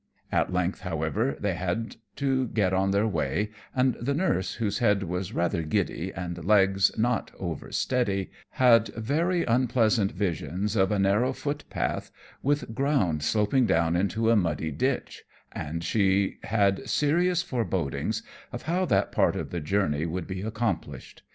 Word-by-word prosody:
At - - +1
length, 90 +1 0
however, 90 - -1
they 100 -2 0
had 90 +6 -3 0.2
to 135 -2 0
get 100 -5 +1
on 95 +1 +2
their 100 +2 +2
way; 105 0 -1 0.2
and 130 -1 +3
the 140 +4 0
nurse, 95 - 0
whose 110 -1 -1
head 105 -4 +3
was 90 0 -3
rather 85 0 0
giddy 90 +1 -1
and 85 -2 -5
legs 95 0 +4
not 120 +1 0
over 85 -6 -5
steady, 100 -7 0 0.2
had 115 -3 +5
very 165 +10 +1
unpleasant 115 -3 +2
visions 95 +2 -2
of 95 -2 +3
a 105 - +2
narrow 105 +7 +2
footpath 145 +2 -3 0.3
with 145 -4 0
ground 110 - +1
sloping 110 - +2
down 85 -1 +2
into 110 +5 +1
a - - +5
muddy 85 -5 0
ditch, 130 - -2 0.3
and 80 +3 -5
she 100 0 +1
had 100 -3 +1
serious 175 +4 +2
forebodings 105 - -2 0.3
of 120 - -6
how 180 +3 0
that - - +1
part - - +2
of - - -4
the 90 - -2
journey 80 -2 0
would 90 +1 -3
be 95 -1 -5
accomplished. 110 -2 -3
100 Hz, 150 wpm, -27 LUFS, 90-120 Hz, 0.3 s, had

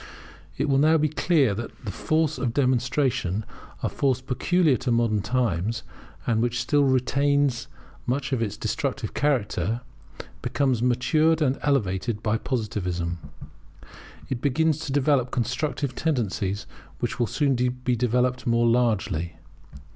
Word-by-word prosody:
It 145 - 0
will 135 -1 +3
be - - +4
now 155 0 +3
clear 145 - +3
to 105 - -3
all 120 - -5
that - - -20
the 100 - -3
force 155 - 0
of 120 -3 -1
demonstration, 125 -6 +1 0.4
a - - +2
force 130 -3 +1
peculiar 145 +4 +2
to 125 - -3
modern 115 -3 +2
times, 115 -2 -1 0.4
and 115 -2 +1
which 120 0 0
still 145 +3 +2
retains 140 0 +2 0.4
much 135 +2 -1
of 125 - 0
its 105 -2 -2
destructive 125 0 -2
character, 115 -6 0 0.6
becomes 130 -1 0
matured 150 +6 +3
and 140 -4 +1
elevated 105 -5 0
by 110 0 +1
Positivism. 90 -8 -2 1.1
It 125 -3 -3
begins 155 +2 +2
to - - -3
develop 135 -2 +2
constructive 130 +3 -2
tendencies, 105 - -1 0.3
which - - -3
will 120 - +2
soon 140 +1 +1
be 125 0 0
developed 125 +2 0
more 115 0 +3
largely. 105 -9 +1
125 Hz, 140 wpm, -25 LUFS, 115-140 Hz, 1.1 s, be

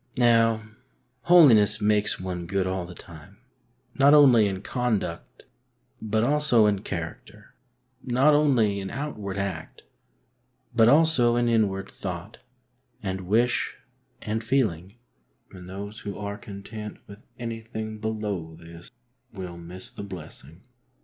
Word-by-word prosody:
Now, 115 -2 +3 0.6
holiness 130 - +6
makes 105 0 +1
one 90 -2 -5
good 95 0 0
all 95 -1 -3
the 90 - -11
time; 75 -3 -13 0.6
not 140 +2 +7
only 125 -8 +6
in 95 0 -4
conduct, 110 -9 -3 0.6
but 110 0 0
also 140 -4 +3
in 105 -2 +2
character; 100 +4 -7 0.5
not 130 +4 +3
only 125 -9 +3
in 95 -1 -5
outward 105 -9 -5
act, 95 -5 -5 0.9
but 115 -1 +6
also 145 -5 +4
in 120 0 +1
inward 100 -4 +1
thought 90 +2 -7 0.6
and 95 -2 -4
wish 120 +5 +1 0.5
and 110 +1 -2
feeling, 105 -7 -1 0.6
and 90 -1 -11
those 100 +3 -7
who 100 - -6
are 100 -1 -5
content 105 +1 -9
with 100 +1 -12 0.2
anything 110 -2 -6
below 105 -7 -4
this 85 +2 -13 0.4
will 90 -3 -8
miss 90 +2 -10
the - - -9
blessing. 85 -4 -10
105 Hz, 125 wpm, -25 LUFS, 95-120 Hz, 0.9 s, not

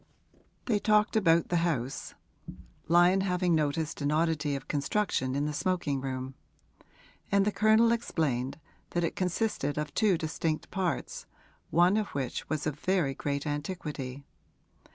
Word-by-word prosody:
They 215 -4 +1
talked 210 +1 +3
about 170 -6 +3
the 175 - +2
house, 150 -7 -2 0.7
Lyon 175 +3 +5
having 180 -2 +1
noticed 155 0 0
an 145 +1 +1
oddity 155 -2 +1
of 135 - -7
construction 140 -3 0
in 145 +1 0
the 150 - -2
smoking 150 -5 -1
room; 130 0 -4 1.0
and 200 0 +4
the 210 - +2
Colonel 220 +2 +4
explained 145 - -1 0.4
that 175 - +2
it 165 - -1
consisted 180 -6 -1
of 150 0 -3
two 210 -5 +3
distinct 160 -1 -3
parts, 185 -6 -3 0.4
one 175 +5 +4
of 215 -2 0
which 130 -3 -3
was 155 -2 -2
of 150 -2 -3
very 180 -7 +1
great 140 +1 -3
antiquity. 145 -3 -4
160 Hz, 140 wpm, -29 LUFS, 145-185 Hz, 1.0 s, Lyon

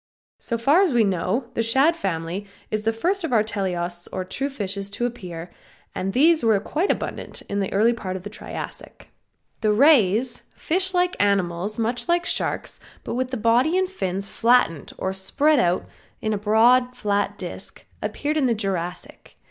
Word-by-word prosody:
So 235 - -2
far 280 +10 +4
as 370 -8 +2
we 235 - +5
know 200 +6 -1
the - - 0
Shad 265 +9 +3
family 185 - -3 0.2
is 215 0 -2
the 225 - +3
first 355 - -1
of 325 - -2
our 220 -3 +4
teleosts 180 -5 -3
or 185 -1 -3
true 270 +9 -3
fishes 200 -6 -4
to 240 +4 -2
appear, 180 -8 -6 0.4
and 190 +1 -2
these 310 +7 +4
were 220 -3 +4
quite 320 - -1
abundant - - -3
in 200 - -3
the 195 - -2
early 225 +4 +3
part 190 -5 -5
of 185 - -6
the 205 - -6
Triassic. - - -8 0.5
The 215 - +2
rays, 240 -2 +4
fish 370 +2 0
like 360 0 +2
animals 195 0 0
much 235 +7 -1
like 345 0 +2
Sharks, - - -2 0.2
but - - -4
with 255 +1 -1
the 255 - -3
body 240 - +3
and 375 0 +2
fins 195 - -3
flattened 230 - +2
or 190 - -2
spread 280 +10 +2
out 175 -2 +1 0.3
in 215 0 -1
a - - 0
broad 240 +4 +4
flat 205 -1 -1
disc, - - -8 0.2
appeared 300 +2 -2
in 275 -4 +3
the 235 - +2
Jurassic. 180 -4 -5
220 Hz, 180 wpm, -23 LUFS, 195-265 Hz, 0.5 s, we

